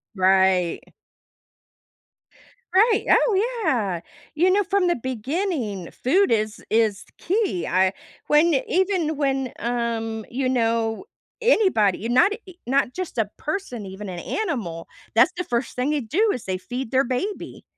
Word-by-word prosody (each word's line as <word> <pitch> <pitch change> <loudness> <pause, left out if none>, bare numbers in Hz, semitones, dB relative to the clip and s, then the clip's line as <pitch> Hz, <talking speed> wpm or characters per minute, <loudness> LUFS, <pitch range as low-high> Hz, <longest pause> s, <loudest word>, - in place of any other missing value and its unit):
Right. 190 -2 +2 1.8
Right. 430 +3 +4
Oh, 465 +2 +2
yeah, 210 - 0 0.3
you 350 +4 +3
know, 405 +2 +3
from 390 0 +1
the 345 - +2
beginning, 255 - -3
food 370 +8 +2
is 215 -1 0
is 220 -2 +1
the - - -26
key, 385 - -1
I 185 +1 +2 0.3
when 310 +2 +4
even 360 -4 +1
when, 270 -3 -1
um, 230 -2 -2
you 255 +1 -1
know, 230 - 0 0.4
anybody, 290 - +3
not 255 +12 +4
a 390 -5 -11
not 265 -1 +1
just 365 -8 -5
a 215 -3 +1
person, 300 - -4
even 190 +1 -7
an 175 - -5
animal, 210 - -3 0.3
that's 230 +3 +6
the 360 - -1
1st 240 +1 -2
thing 255 +4 0
they 300 -2 0
do 365 - +1
is 245 - -6
they 185 -1 -2
feed 245 +6 -6
their 265 +1 +3
baby. 265 - -4
255 Hz, 140 wpm, -23 LUFS, 215-360 Hz, 1.8 s, that's